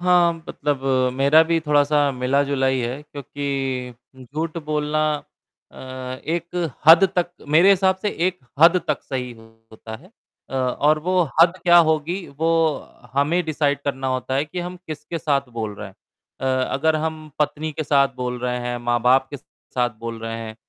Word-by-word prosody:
हाँ, 175 -1 +4 0.2
मतलब 145 -2 -2 0.3
मेरा 140 +4 +5
भी 165 0 +1
थोड़ा-सा 145 0 +3
मिला-जुला 135 +1 0
ही 130 -1 +1
है 125 +4 -4
क्योंकि 140 -3 -4 0.2
उम, 130 - -13
झूठ 155 +6 -4
बोलना 150 0 -1 0.7
अ, - - -21 0.5
एक 170 0 -2 0.2
हद 165 +4 +9
तक 175 -1 +1 0.2
मेरे 165 +6 +6
हिसाब 190 -1 +3
से 210 - -2 0.2
एक 185 0 -2 0.2
हद 170 +3 +7
तक 150 - -1
सही 125 -2 -4 0.4
होता 110 0 -9
है 180 - -19 0.4
अ, - - -6
और 135 +4 +1
वो 180 +3 +1 0.2
हद 170 +2 +5
क्या 175 -1 +6
होगी 165 +5 -2
वो 165 +1 +1 0.6
हमें 145 +6 +1
डिसाइड 145 -2 0
करना 135 -2 -2
होता 130 0 -2
है 140 +2 +1
कि 155 +4 -8
हम 180 +1 -6
किसके 155 +2 -6
साथ 140 -4 0
बोल 110 -3 -4
रहे 100 +1 -8
हैं। 95 - -18 0.5
अ, 130 -1 +1
अगर 155 +3 +2
हम 155 0 -4
पत्नी 155 +1 -1
के 155 - -3
साथ 140 -1 +3
बोल 125 -1 -3
रहे 125 0 -2
हैं, 120 0 -3
माँ-बाप 120 +2 +2
के 145 - -5
साथ 125 -2 -4
बोल 115 0 -6
रहे 115 0 -4
हैं, 110 -1 -7
145 Hz, 170 wpm, -22 LUFS, 130-160 Hz, 0.7 s, हद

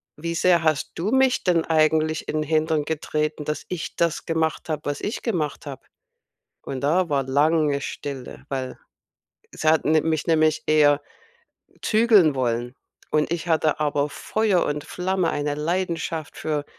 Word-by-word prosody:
wie 170 +2 -4
sehr 170 0 +3
hast 155 -2 0
du 195 +7 -2
mich 265 -1 +3
denn 175 -3 +2
eigentlich 155 0 +1
in 155 - -2
'n - - 0
Hintern 155 0 +1
getreten, 150 -1 -2
dass 150 +1 -3
ich 180 -3 -5
das 170 -2 0
gemacht 160 -1 -1
habe, 155 -2 -2
was 145 0 -2
ich 210 - -4
gemacht 155 - -2
habe?“ 135 - -8 0.8
Und 130 -2 -5
da 170 +5 +2
war 140 -3 0
lange 145 +1 +2
Stille, 135 -2 -7
weil 130 -2 -4 0.8
sie 155 - +1
hat 160 0 +3
ni 155 +1 +4
mich 160 0 -1
nämlich 155 -1 +2
eher 150 -1 +4 0.8
zügeln 215 -9 +4
wollen 120 -1 -1 0.4
und 155 +1 +1
ich 170 -1 -3
hatte 155 -2 +2
aber 145 -1 +1
Feuer 210 +2 0
und 145 0 -3
Flamme, 185 -1 -1
eine 145 0 -2
Leidenschaft 165 0 -3
für 150 -2 -2
155 Hz, 155 wpm, -23 LUFS, 145-170 Hz, 0.8 s, ni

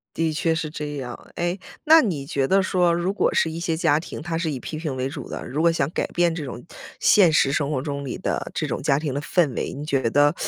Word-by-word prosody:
的 165 -1 0
确 160 +2 +1
是 160 -1 -2
这 150 -1 -5
样。 125 -3 -7
诶， 175 +2 -1 0.3
那 320 +1 +7
你 155 - -2
觉 140 -1 0
得 195 +1 +4
说， 180 -2 +2
如 175 +3 0
果 205 - +1
是 165 - +2
一 160 - -5
些 165 -1 -1
家 160 -2 +2
庭， - - -8
它 165 +1 -3
是 165 -1 -1
以 140 - -3
批 155 - -6
评 155 -4 -4
为 130 +1 -1
主 135 - -7
的， - - -6
如 145 +5 -2
果 170 - +5
想 140 -5 0
改 - - -1
变 175 -1 +1
这 160 -3 -4
种 125 -2 -7 0.3
现 185 -6 +5
实 140 -3 +3
生 145 -1 0
活 140 -4 0
中 140 0 -4
里 130 - -5
的 - - -2
这 - - -1
种 - - -3
家 140 -1 +2
庭 150 -3 -3
的 140 - -1
氛 150 -3 +1
围， - - -3
你 145 +2 -6
觉 135 -6 0
得 145 +4 +4
155 Hz, 285 characters per minute, -23 LUFS, 140-170 Hz, 0.3 s, 那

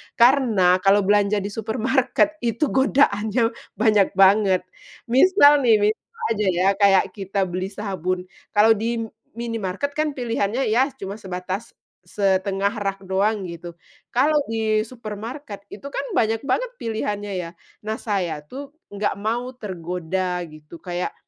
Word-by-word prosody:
Karena, 235 -8 +4
kalau 200 +1 +4
belanja 205 0 +3
di 200 - -4
supermarket 255 +8 0
itu 235 +5 0
godaannya 235 -4 +2 0.2
banyak 210 -4 +3
banget. 195 -1 +5 0.5
Misal 290 - +6
nih, 220 - +6
misal 460 - -15
aja 210 -2 0
ya, 180 +2 +1
kayak 200 -2 +5
kita 195 0 -1
beli 185 +2 -3
sabun, 185 -3 -3 0.3
kalau 215 +2 +6
di 230 +2 -2
m 225 - -9 0.2
minimarket 230 +1 -3
kan 305 -1 0
pilihannya, 235 -1 -1
ya, 255 +5 +3
cuma 195 -4 -6
sebatas 185 +2 -5 0.3
1/2 195 +1 0
rak 195 -1 -2
doang, 195 +2 0
gitu. 170 0 -8 0.4
Kalau 295 +5 +3
di 220 -1 +1
supermarket, 225 0 -8
itu 210 - -10
kan - - -3 0.2
banyak 225 0 +1
banget - - 0
pilihannya, 205 -2 -3
ya. 170 -2 -5 0.3
Nah, 220 +1 -2
saya 180 -8 -2
tuh, 275 - -9 0.2
nggak 205 0 -1
mau 240 +4 -2
tergoda 180 -2 -3
gitu, 155 +2 -13
kayak, 180 -1 -3
210 Hz, 135 wpm, -22 LUFS, 190-235 Hz, 0.5 s, Misal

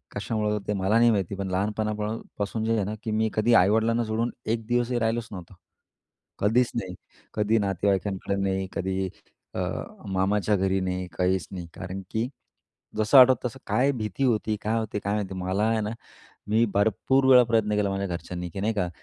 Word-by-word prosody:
कशामुळे? 105 -2 -1
ते 105 - 0
मला 100 +3 +2
नाही 120 0 +6
माहिती, 100 -2 -1
पण 95 0 -4
लहानपणापासून 105 +1 -2
जे 115 - +1
आहे 105 - +1
ना, 105 - -3
की 110 - -3
मी 110 0 +1
कधी 110 +2 +2
आई-वडिलांना 110 +3 +4
सोडून 115 +2 -1 0.2
एक 115 -1 -3
दिवसही 120 0 +1
राहिलोच 115 0 -1
नव्हतो. 90 -2 -9 0.9
कधीच 115 +4 +2
नाही. 95 -6 -3 0.4
कधी 105 +1 +2
नातेवाईकांकडे 100 0 0
नाही. 95 -1 -1
कधी 95 0 -2 0.5
अ, - - -2 0.5
मामाच्या 100 +2 +1
घरी 95 0 +1
नाही. 90 0 -2
काहीच 90 0 +1
नाही. 90 -3 -6
कारण 95 +1 -6
की 110 +2 0 0.7
जसं 110 +6 +4
आठवतं 130 -1 +6
तसं 130 +3 -10
काय 135 +3 +2
भीती 110 +3 -3
होती? 110 -2 +1
काय 110 +2 0
होती? 105 -2 -3
काय 100 0 -2
माहिती? 100 -3 -2
मला 95 +2 -1
आहे 110 0 +2
ना, 105 - -2 0.6
मी 110 +2 +3
भरपूर 110 +6 +2
वेळा 125 -1 +9
प्रयत्न 110 -2 +1
केला 105 -1 +1
माझ्या 95 0 -2
घरच्यांनी, 90 0 -5
की 95 - -6
नाही 110 +3 +1
का, 90 -4 0
105 Hz, 175 wpm, -26 LUFS, 95-115 Hz, 0.9 s, वेळा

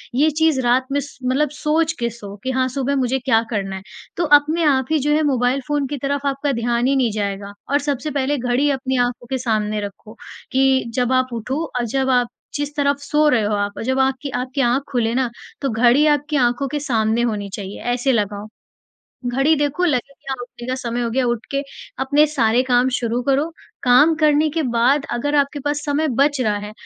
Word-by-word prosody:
ये 295 +5 +4
चीज़ 310 -2 +2
रात 250 +1 +2
में 285 - +1
स 285 0 -8
मतलब 265 +4 +1
सोच 310 +2 0
के 235 0 0
सो 205 -3 -10
कि 260 - -1
हाँ, 260 0 +1
सुबह 275 +1 -1
मुझे 265 0 0
क्या 245 -3 +2
करना 195 -4 -3
है। 190 - -7 0.4
तो 350 - +1
अपने 310 +4 -1
आप 270 -4 +3
ही 315 - +3
जो 295 +2 0
है 310 - +2
मोबाइल 260 -1 +1
फ़ोन 290 -2 0
की 290 +2 -4
तरफ 280 +1 -2
आपका 280 +1 0
ध्यान 235 +1 0
ही 275 - +2
नहीं 250 -4 +2
जाएगा। 200 -1 -4 0.2
और 285 - +3
सबसे 285 +1 -2
पहले 285 +1 0
घड़ी 250 +3 +1
अपनी 265 -1 -1
आँखों 245 0 -6
के 265 - +1
सामने 215 -4 -1
रखो, 205 +1 -8 0.4
कि 265 0 +3
जब 250 -1 +1
आप 255 0 +2
उठो 255 +7 -3 0.2
और 240 - -1
जब 265 +3 0
आप 245 -2 +3 0.3
जिस 290 0 -3
तरफ 285 -1 +1
सो 300 +2 +1
रहे 240 -6 +2
हो 210 +1 0
आप 205 0 -1
और - - -4
जब 260 +3 0
आपकी 265 +1 0
आपकी 255 +2 -2
आँख 250 +2 +2
खुले 235 -3 0
ना, 255 -1 +1 0.3
तो 275 - 0
घड़ी 240 +5 +4
आपकी 295 0 +1
आँखों 245 +1 +1
के 295 +3 -3
सामने 230 -5 0
होनी 210 -4 -2
चाहिए 200 -1 -7
ऐसे 250 +2 +1
लगाओ। 205 -3 -1 0.8
घड़ी 270 +6 +2
देखो 295 +4 0
लगेगी 275 -1 -2
उठने 240 0 -10
का 255 - -1
समय 245 -2 -3
हो 235 - -1
गया, 260 +2 +1
उठ 240 -1 -1
के 275 0 0 0.4
अपने 285 +3 +4
सारे 245 -5 +2
काम 250 0 +2
शुरू 235 0 -1
करो। 280 +5 +1 0.3
काम 255 +6 +6
करने 305 0 +3
के 320 +1 -1
बाद 255 +3 +2
अगर 290 +5 -1
आपके 285 0 +1
पास 290 0 0
समय 295 +2 0
बच 285 0 +3
रहा 210 -4 +1
है, 210 - -8
260 Hz, 215 wpm, -20 LUFS, 240-285 Hz, 0.8 s, काम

